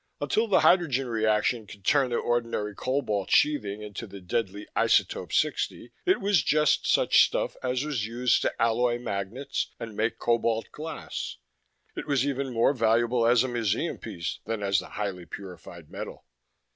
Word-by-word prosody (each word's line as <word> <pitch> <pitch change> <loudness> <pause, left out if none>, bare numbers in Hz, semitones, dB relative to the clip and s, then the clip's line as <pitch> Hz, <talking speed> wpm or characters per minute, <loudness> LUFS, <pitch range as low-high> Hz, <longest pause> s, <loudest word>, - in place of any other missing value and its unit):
Until 225 +1 +1
the 205 - +4
hydrogen 145 -8 +3
reaction 110 0 +1
could 100 -2 -13
turn 140 -3 +3
the 120 - -1
ordinary 115 -4 -1
cobalt 105 -5 -1
sheathing 105 -9 +2
into 105 -1 -7
the 100 - -10
deadly 100 +2 -3
isotope - - +2
60, 120 - -1 0.2
it 375 - +4
was 200 -5 +3
just 150 +3 +2
such - - +5
stuff - - -1
as 130 +2 -1
was 145 -8 -2
used 120 +2 +1
to - - -2
alloy 120 +1 +2
magnets 120 +5 -3
and 115 -2 -7
make 110 +2 0
cobalt 115 -1 0
glass. 155 - -6 0.6
It - - -6
was 140 -3 +2
even 140 -1 -2
more 115 +4 +3
valuable 115 0 +2
as 120 0 +5
a - - -1
museum 120 -5 -1
piece 85 0 -5
than 110 -2 -3
as 100 -1 +2
the - - -9
highly 95 -4 -4
purified 85 -4 -10
metal. - - -7
115 Hz, 160 wpm, -27 LUFS, 105-130 Hz, 0.6 s, such